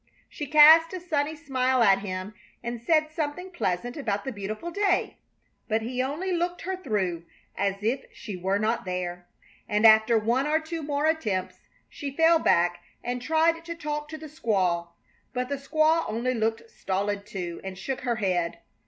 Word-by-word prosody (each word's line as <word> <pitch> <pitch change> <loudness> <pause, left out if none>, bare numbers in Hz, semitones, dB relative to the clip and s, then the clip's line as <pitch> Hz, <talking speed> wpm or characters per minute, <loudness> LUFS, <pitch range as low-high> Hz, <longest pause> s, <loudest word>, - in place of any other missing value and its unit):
She 295 - -6
cast 315 +4 +8
a 370 - -3
sunny 310 -3 -1
smile 260 -4 +1
at 195 -3 +5
him 190 0 -5 0.3
and 235 -1 -4
said 310 +3 +2
something 320 +4 -4
pleasant 245 - -2
about 210 -8 -2
the 265 - -2
beautiful 215 - -5
day, 395 0 +1 0.5
but 220 0 0
he 250 +2 -2
only 300 +9 -2
looked 350 0 -1
her 380 +2 -2
through 190 - -2 0.3
as 200 +1 -1
if 240 +5 0
she 210 -4 -8
were 190 +2 0
not 220 +3 0
there, 180 -1 -4 0.4
and 210 +1 +2
after 220 +1 +7
one 235 +6 +1
or 310 +1 +2
two 325 +1 -5
more 290 0 -1
attempts 220 - -1 0.3
she 285 - -6
fell 325 0 +5
back 175 - +2 0.2
and 245 0 -3
tried 325 +3 +2
to 335 0 -6
talk 300 -2 -4
to 315 - -6
the 315 - -10
squaw; 195 - 0 0.5
but 250 0 -2
the 280 - -1
squaw 310 +4 +2
only 235 +4 -1
looked 225 0 -1
stolid, 200 +1 -2
too, 175 -5 -5
and 190 -1 -6
shook 255 +8 -4
her 240 -1 0
head. 180 -6 -1
250 Hz, 175 wpm, -26 LUFS, 200-310 Hz, 0.5 s, cast